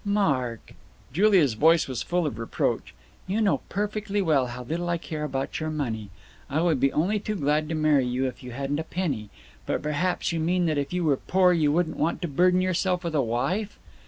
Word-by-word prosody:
"Mark!" 140 - 0 0.4
Julia's 185 - +4
voice 160 +8 +4
was 130 -3 -3
full 175 -1 0
of 130 -7 -3
reproach. 115 - -2 0.3
"You 195 +4 0
know 210 -3 +2
perfectly 205 0 -2
well 150 -9 +2
how 125 +1 -7
little 170 +7 -3
I 170 - +1
care 155 -2 -5
about 135 -2 -3
your 155 0 -2
money. 115 -9 -3 0.4
I 145 - 0
would 165 -4 +2
be 135 +1 +3
only 195 +7 +1
too 215 +1 -3
glad 150 -2 0
to 165 - -1
marry 150 -4 +3
you 125 +2 0
if 130 - -5
you 125 - -8
hadn't 140 +4 -2
a - - -2
penny. 150 - -3 0.4
But - - -1
perhaps 150 +6 0
you 165 - -1
mean 175 +2 +1
that 155 -3 +1
if 140 - -3
you 180 0 -1
were 145 -4 +3
poor 185 +3 +3
you 155 -4 +2
wouldn't 165 +1 0
want 165 - 0
to - - 0
burden 180 +5 +3
yourself 185 0 0
with 170 -2 -3
a 150 - +3
wife?" 135 - -1
155 Hz, 215 wpm, -26 LUFS, 135-180 Hz, 0.4 s, Julia's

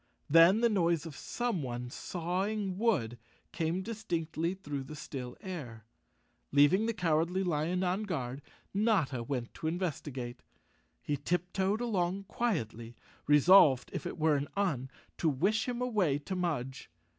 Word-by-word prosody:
Then 165 +7 +6
the 235 - +5
noise 170 -6 +1
of 160 -4 -8
someone 130 - -3
sawing 190 +4 -2
wood 120 - +1 0.3
came 170 +2 -1
distinctly 175 -6 -2
through 145 -7 -5
the 155 - -8
still 125 -4 -7
air. 125 - -7 0.7
Leaving 145 +10 +5
the 230 - 0
Cowardly 175 +1 +1
Lion 175 +2 0
on 185 +3 0
guard, 135 -8 -3 0.3
Notta 195 - +1
Went 120 -1 -4
to 160 - -5
investigate. 145 -8 -3 0.6
He 145 - -1
tiptoed 180 - -1
along 195 -4 0
quietly, 120 - -2 0.3
resolved 150 -2 +6
if - - -3
it - - -6
were 155 -1 +3
an 140 0 -1
Un 150 -10 0 0.3
to 165 - +3
wish 195 - +1
him 250 0 -2
away 200 - +1
to 150 +6 -5
Mudge. 145 -8 -3
170 Hz, 135 wpm, -31 LUFS, 140-195 Hz, 0.7 s, Then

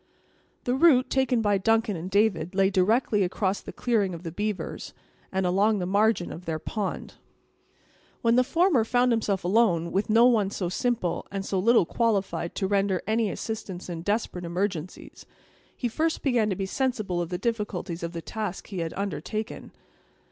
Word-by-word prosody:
The 245 - 0
route 265 -2 +4
taken 255 -3 +2
by 205 -2 +2
Duncan 225 +1 +2
and 170 +2 -5
David 190 -4 +1
lay 195 0 +3
directly 210 +3 +2
across 190 +1 0
the - - -8
clearing 205 -7 0
of 165 - -10
the 165 - -5
beavers, 205 +3 -4 0.4
and 190 0 0
along 200 +4 +3
the 180 - -2
margin 200 -1 +2
of 175 +3 -9
their 160 -1 -2
pond. 200 +5 -4 1.1
When 230 0 +4
the 250 - +5
former 325 - +3
found 245 +2 +2
himself 210 -4 0
alone 175 -4 +2
with 195 +3 0
one 225 -2 +5
so 185 -3 -3
simple, 220 -2 -1
and 195 -1 -4
so 195 - -1
little 230 -1 +4
qualified 195 -6 -1
to 195 - -1
render 195 -2 +1
any 220 0 +1
assistance 195 -4 -5
in 165 -1 -5
desperate 205 -2 -2
emergencies, 175 -1 -4 0.5
he 245 - -1
first 315 +7 -1
began 240 -6 +2
to 190 - -1
be 195 - -2
sensible 215 -6 -1
of 170 - -4
the 180 - -2
difficulties 200 -5 -3
of 170 +1 -4
the 165 -1 -6
task 210 -4 -5
he 195 -4 -4
had 165 -1 -3
undertaken. 205 +2 -4
200 Hz, 170 wpm, -26 LUFS, 180-230 Hz, 1.1 s, the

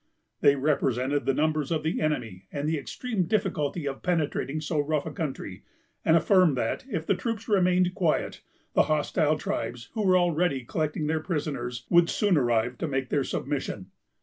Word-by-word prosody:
They 140 - +5
represented 135 -1 0
the 135 - +3
numbers 155 -1 +1
of 160 -2 -1
the 160 - -1
enemy, 115 -12 -2
and 145 +1 -3
the 160 -1 0
extreme 190 - -3
difficulty 175 -6 -1
of 135 -1 -4
penetrating 155 -4 -1
so 155 0 -2
rough 145 0 0
a - - -4
country; 135 - -5 0.4
and 160 - +5
affirmed 170 -3 +4
that, 115 -2 -1
if 165 -9 -3
the - - +3
troops 230 -2 -4
remained 180 -3 +3
quiet, 170 -4 0 0.3
the - - +4
hostile 155 0 +2
tribes, 115 -3 -4
who 220 -2 -1
were 185 -2 +5
already 170 -7 +1
collecting 155 +3 -2
their 160 +1 0
prisoners, 135 -8 -3
would 170 -1 +5
soon 205 -4 +2
arrive 120 -3 +1
to 165 - -1
make 135 -2 -2
their 145 -2 +1
submission. 130 -10 -4
155 Hz, 175 wpm, -27 LUFS, 135-175 Hz, 0.4 s, They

